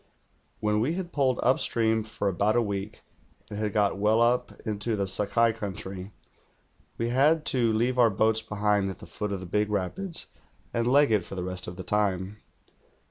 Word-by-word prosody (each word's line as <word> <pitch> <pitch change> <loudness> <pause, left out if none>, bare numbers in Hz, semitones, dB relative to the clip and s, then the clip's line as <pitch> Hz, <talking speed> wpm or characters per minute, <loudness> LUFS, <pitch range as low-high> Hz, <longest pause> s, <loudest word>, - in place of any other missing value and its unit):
When 105 0 +1
we 140 +10 0
had 180 -2 -5
poled 130 -3 +1
upstream 115 -3 +2
for 105 -1 -4
about 100 +4 +1
a 120 - +4
week, 100 0 -5 0.5
and 105 - -5
hatl 105 -1 -1
got 100 -1 +1
well 105 +2 +3
up 120 +1 +2
into 110 +1 -1
the 100 -1 -1
Sakai 110 +4 +3
country, 95 -2 -6 0.9
we 115 0 -1
had 150 +6 +3
to 120 -3 +2
leave 120 +3 0
our 120 -2 +6
l)oats 110 +2 +2
behind 105 -2 0
at 95 - -6
the - - -12
foot 105 -1 -5
of 95 -2 -3
the - - -7
big 105 +4 0
rapids, 105 - -2 0.5
and 115 0 0
leg 145 -1 +5
it 105 -4 +2
for 95 - -8
the 90 - -3
rest 90 0 -3
of 90 - -6
the 95 -1 -8
lime. 100 -1 0
105 Hz, 190 wpm, -27 LUFS, 100-120 Hz, 0.9 s, our